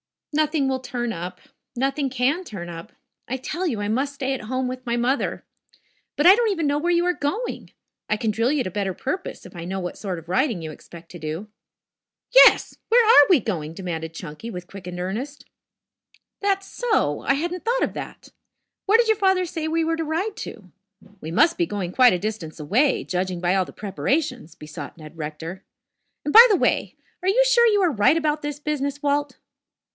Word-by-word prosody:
"Nothing 305 -2 +1
will 260 0 -1
turn 245 -2 -3
up. 180 +1 -7 0.3
Nothing 270 +2 0
can 265 +8 0
turn 190 - -7
up. 170 +6 -9 0.3
I 260 - -2
tell 340 +8 -3
you, 225 -9 -2
I 205 - -2
must 275 +5 -1
stay 270 -1 -2
at 260 - -5
home 255 +3 -2
with 255 0 -6
my 235 -1 0
mother. 255 +4 -1 0.7
But 295 - 0
I 375 +2 +10
don't 465 0 +1
even 335 -6 -1
know 290 0 +1
where 345 +3 0
you 345 0 +2
are 360 - +2
going. 385 +12 -3 0.4
I 215 - +1
can 220 -1 0
drill 230 +4 +1
you 295 -3 +1
to 185 - -5
better 195 0 -2
purpose 370 +8 -5
if 185 - -13
I 170 -1 -6
know 190 +2 -3
what 175 - -5
sort 190 -4 -4
of 165 0 -11
riding 230 - +1
you 160 -1 -6
expect 165 +2 -13
to 175 - -9
do." 160 +7 -5 0.8
"Yes! - - +7
Where 475 0 +5
are 360 -10 +8
we 340 -9 +5
going?" 160 -7 -3
demanded 165 -3 -5
Chunky, 165 +7 -8
with 180 -5 -7
quickened 180 -2 -8
interest. 235 +11 -5 0.9
"That's 390 -1 0
so. 440 - 0
I - - +2
hadn't 345 +4 -3
thought - - +1
of - - -1
that. - - -8 0.6
Where 420 +3 +6
did 470 -1 +3
your 440 - +4
father 380 -2 +2
say 320 -2 -4
we 325 +1 +1
were 325 0 0
to 325 - -2
ride 370 +8 -2
to? 190 -5 -9 0.5
We 160 - -7
must 330 - +3
be 345 - +2
going 195 -4 -3
quite 250 +3 +6
a - - +1
distance 190 -5 -5
away, 235 - +2
judging 180 -1 -2
by 180 0 +2
all 190 -1 +2
the - - -12
preparations," 250 - -2
besought 150 0 -9
Ned 155 0 -12
Rector. 160 +4 -6 0.6
"And, 295 - -2
by 465 +2 +11
the 415 - +5
way, - - 0 0.3
are 370 - +1
you - - +4
sure 480 -1 +5
you 415 -2 +3
are 360 -3 +3
right 230 +6 +3
about 305 -1 0
this 290 -1 -5
business, 290 -1 -3
Walt?" 285 -1 0
260 Hz, 205 wpm, -23 LUFS, -, 0.9 s, by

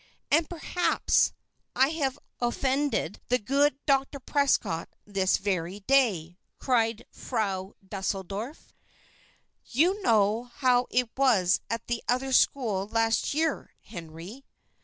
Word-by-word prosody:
"And 315 +1 +3
perhaps 350 +1 +1 0.4
I 265 +1 +4
have 285 -4 -1 0.2
offended 260 - -1
the 250 - +3
good 275 +5 +1
Dr. 275 0 +1
Prescott 270 - 0 0.2
this 195 -2 +1
very 190 0 -2
day," 195 -9 +1 0.2
cried 230 -4 0
Frau 200 -5 -3
Deuseldorf. 195 - -5 0.9
"You 355 - +1
know 220 - +2
how 250 -2 +3
it 245 -2 0
was 225 -10 +3
at 230 -1 -3
that 240 -1 -2
other 260 +2 0
school 215 -9 +2
last 225 +4 0
year, 315 -2 -1
Henry." 175 +6 -10
240 Hz, 110 wpm, -27 LUFS, 195-275 Hz, 0.9 s, I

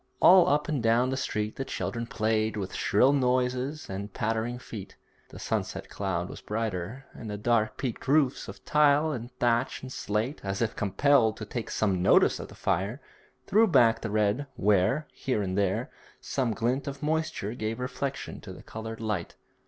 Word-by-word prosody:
All 180 -1 +7
up 150 +1 +2
and 150 -5 -1
down 115 +3 +3
the - - 0
street 105 -5 -2
the 135 - -2
children 115 -3 -4
played 110 -1 0
with 95 -2 -4
shrill 130 +7 +3
noises 130 +2 0
and 100 +2 -5
pattering 115 +4 -1
feet. 110 -5 -9 0.3
The - - -11
sunset - - -3
cloud - - -2
was - - -9
brighter, 110 +3 -3
and 110 - -8
the 105 - -4
dark 110 0 +1
peaked 130 -1 -4
roofs 140 -2 +2
of 100 0 -10
tile 150 +1 +4
and 120 -4 -5
thatch 120 +2 +1
and 130 0 -7
slate, 110 +8 -2
as 95 0 -2
if 115 -2 -1
compelled 115 +2 +3
to 105 - -6
take 115 +2 -5
some 95 -4 0
notice - - +4
of - - -6
the - - -14
fire, 100 +7 -1 0.5
threw 220 +3 +4
back 120 - +4
the 110 - -3
red 105 +6 +1
where, 105 +9 +2
here 125 -6 -1
and 95 -1 -2
there, 100 -2 0 0.3
some 125 -5 -1
glint 125 +6 -1
of 140 +1 -6
moisture 155 -9 -1
gave 110 0 -3
reflection 130 +2 -4
to - - -9
the - - -12
coloured 110 0 -7
light. 105 -6 -3
115 Hz, 180 wpm, -28 LUFS, 105-135 Hz, 0.5 s, All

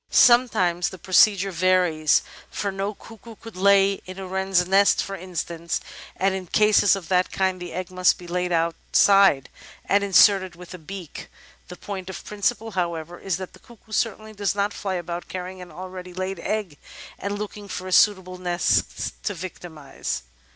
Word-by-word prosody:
Sometimes 220 -9 +4
the 190 - -10
procedure 195 +1 +4
varies, 175 -3 +2 0.3
for 200 - -3
no 195 +2 -3
cuckoo 225 +1 -13
could 225 -1 -12
lay 195 +1 +4
in 185 0 -8
a 190 - -6
wren's 190 -1 +1
nest, 195 +2 +4
for 195 - -6
instance, 170 -2 -4 0.4
and 195 0 +1
in 190 -1 -5
cases 210 0 +4
of 190 -4 -8
that 180 -1 +2
kind 190 -1 -1
the 175 -1 -6
egg 185 +1 -5
must 185 -1 +3
be 180 - -12
laid 180 +1 -2
out 165 0 +1 0.2
side 195 -9 +5 0.4
and 200 0 +2
inserted 195 -2 +4
with 180 +1 -12
the 185 - -8
beak. 175 0 -9 0.4
The 180 - -9
point 190 -1 -7
of 190 - -8
principle, 220 +2 -2
however, 170 -2 -3
is 190 -3 -2
that 185 -1 -8
the - - -16
cuckoo 230 -2 -19
certainly 215 0 -2
does 205 -1 -1
not 205 0 0
fly 190 -2 -3
about 175 0 -5
carrying 185 0 -6
an 180 - -11
already 185 +1 -9
laid 185 0 -4
egg 195 -5 -3 0.4
and 200 +1 -3
looking 210 0 -7
for 185 -1 -6
a - - -6
suitable 185 -2 +3
nest 175 -1 -1
to 205 - -1
victimise. 165 - -6
185 Hz, 175 wpm, -24 LUFS, 180-200 Hz, 0.4 s, side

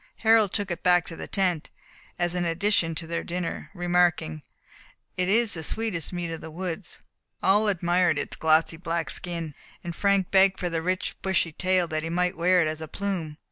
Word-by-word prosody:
Harold 220 -3 +5
took 205 -3 -2
it 175 - -4
back 180 -2 +4
to 165 - -8
the - - -7
tent, 180 -6 0 0.5
as 175 0 0
an 180 -1 0
addition 170 -1 +1
to 165 - -5
their 170 +1 -3
dinner, 175 -1 -4
remarking, 175 - +1 0.7
"It 180 0 0
is 225 +1 +4
the 160 - -2
sweetest 180 -1 -1
meat 175 -2 -3
of 165 - -6
the 160 - -8
woods." 180 +2 -5 0.5
All 205 +3 +4
admired 175 -3 +2
its 145 - -3
glossy 160 +1 +2
black 165 -1 -3
skin, 170 -3 -4 0.3
and 170 -1 -5
Frank 200 -1 +1
begged 190 0 +4
for 180 -2 -2
the 165 -1 -1
rich 185 +3 -2
bushy 190 -3 +1
tail, 185 +2 +1
that 155 0 -1
he 165 - -4
might 180 +2 0
wear 180 +1 +3
it - - 0
as 155 0 -4
a 160 - -5
plume. 175 -4 -4
175 Hz, 195 wpm, -26 LUFS, 165-190 Hz, 0.7 s, Harold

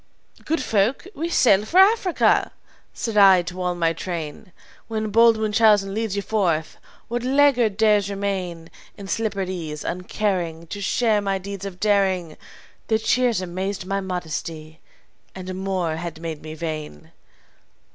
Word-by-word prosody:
"'Good 315 -3 -1
folk, 220 - +1
we 330 +1 -3
sail 205 - +4
for 325 +11 -2
Africa,' 385 -2 +4 0.4
said 225 -3 -4
I 190 -3 +7
to 180 +2 -6
all 180 -1 -1
my 165 -1 +1
train. 170 +3 -6 0.4
'When 220 -2 -3
bold 230 +1 +5
Munchausen 210 -2 +3
leads 220 -1 -2
you 200 - -2
forth, 175 -8 -1 0.3
what 240 +1 -2
laggard 255 -6 +3
dares 210 -2 +3
remain 190 -4 -4 0.3
In 200 -2 -9
slippered 200 -3 -2
ease, 160 -5 -5
uncaring 180 -3 -2
To 205 - -6
share 215 +1 +1
my 195 -1 -1
deeds 195 0 -7
of 185 -2 -7
daring?' 190 -6 +1 0.5
Their 220 - +2
cheers 230 -1 +1
amazed 185 +2 -4
my 195 +1 -2
modesty, 160 -3 -5 0.6
and 185 0 -6
more 185 -4 -2
had 170 -1 -6
made 165 -2 -6
me 155 0 -8
vain. 155 - -6
195 Hz, 145 wpm, -23 LUFS, 175-220 Hz, 0.6 s, I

